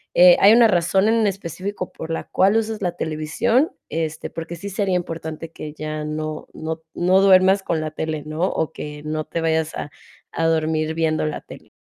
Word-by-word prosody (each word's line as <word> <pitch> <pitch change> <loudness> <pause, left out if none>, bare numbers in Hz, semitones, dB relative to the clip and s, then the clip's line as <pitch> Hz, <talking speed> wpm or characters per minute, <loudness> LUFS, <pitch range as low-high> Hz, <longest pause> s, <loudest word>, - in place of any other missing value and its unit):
Eh, 180 0 +8
¿hay 205 +3 +7
una 235 -1 +7
razón 190 +2 +2
en 225 -1 +3
específico 190 0 -4
por 160 - -8
la 165 - -2
cual 195 +3 +2
usas 220 -1 -2
la 175 -2 -1
televisión?, 215 - 0 0.2
este, 160 -1 -3
porque 165 +1 -6
sí 200 +4 -7
sería 195 -1 0
importante 165 -2 -5
que 150 -2 -8
ya 155 0 -5
no 155 0 -4
no 160 +1 -4
t 160 - -34
no 185 +2 +3
duermas 190 0 +5
con 165 -4 -1
la 155 - -4
tele, 155 -1 -3
¿no?, 155 +2 -5
o 160 - -2
que 150 0 -8
no 155 0 -2
te 165 - -3
vayas 160 -1 0
a 145 - -5 0.4
a 165 - -1
dormir 160 -1 0
viendo 160 -1 +1
la 150 - -4
tele. - - -13
165 Hz, 200 wpm, -22 LUFS, 155-190 Hz, 0.4 s, Eh